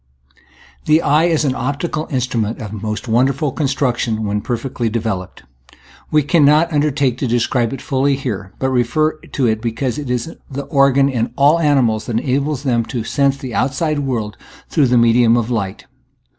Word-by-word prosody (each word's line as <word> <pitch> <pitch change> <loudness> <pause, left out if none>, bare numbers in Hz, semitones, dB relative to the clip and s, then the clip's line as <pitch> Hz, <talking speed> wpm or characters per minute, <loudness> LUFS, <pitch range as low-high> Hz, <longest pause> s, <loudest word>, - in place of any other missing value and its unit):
The 155 +2 +3
eye 150 +3 +3
is 160 -3 +1
an 135 - +1
optical 145 +5 -3
instrument 120 -5 -2
of 105 -2 -6
mo9t 105 +2 -5
wonderful 135 +5 +1
construction 125 -6 -1
when 105 0 -1
perfectly 120 0 -3
de 115 +2 -1
veloped. 100 - -5 0.7
We 150 -1 +3
cannot 155 +2 +3
undertake 140 -4 +1
to 135 - -1
describe 120 0 0
it 135 - -6
fully 140 0 +1
here, 105 -8 -5
but 130 0 -1
refer 155 +6 +1
to 135 - -3
it 110 -1 +1
because 120 +4 -2
it 145 -4 -6
is 125 +6 -2 0.2
the 140 0 -5
organ 140 0 +3
in 120 -4 -1
all 145 +4 +4
animals 130 -9 +2
that 115 - -1
enables 140 +3 -1
them 120 -4 +1
to 120 -2 -4
sense 140 +3 +1
the 130 -3 -7
outside 140 +5 0
world 115 -7 -3 0.3
through 145 -4 +2
the 125 0 +3
medium 115 0 +4
of 120 0 -1
light. 100 -5 -3
130 Hz, 170 wpm, -18 LUFS, 115-140 Hz, 0.7 s, all